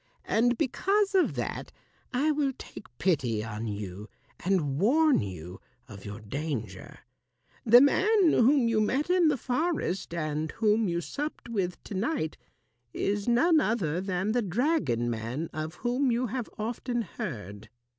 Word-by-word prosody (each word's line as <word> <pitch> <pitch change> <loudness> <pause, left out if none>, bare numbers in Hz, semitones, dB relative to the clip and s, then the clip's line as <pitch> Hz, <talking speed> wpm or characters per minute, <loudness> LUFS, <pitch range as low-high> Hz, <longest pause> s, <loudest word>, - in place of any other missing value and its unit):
And 240 +2 +2
because 395 - +1
of 375 -2 +3
that, - - -4 0.4
I 280 +4 +2
will 285 -2 0
take - - -11
pity 125 - +1
on 115 0 -5
you 105 0 -6 0.3
and 155 -7 +1
warn 295 - +4
you 90 -2 -7 0.3
of 100 -5 -11
your 105 +2 -7
danger. 110 -4 -5 0.7
The 240 +3 +9
man 380 +5 +4
whom 255 +1 +4
you 225 -2 +2
met 275 +10 0
in 360 -2 +4
the 300 -2 +2
forest 255 - -1
and 155 -1 -2
whom 220 -1 +2
you 170 -1 -1
supped 290 - -5
with 190 -6 -2
to - - -8
night 195 - -1 0.6
is 205 +1 -1
none 310 +8 +4
other 185 - 0
than 190 +1 -1
the 245 +2 +1
dragon 190 - 0
man 120 +7 -3
of 155 +2 -4
whom 250 +5 0
you 240 +2 +1
have 245 0 -4
often 235 +2 -2
heard. 110 - -7
210 Hz, 145 wpm, -28 LUFS, -, 0.7 s, The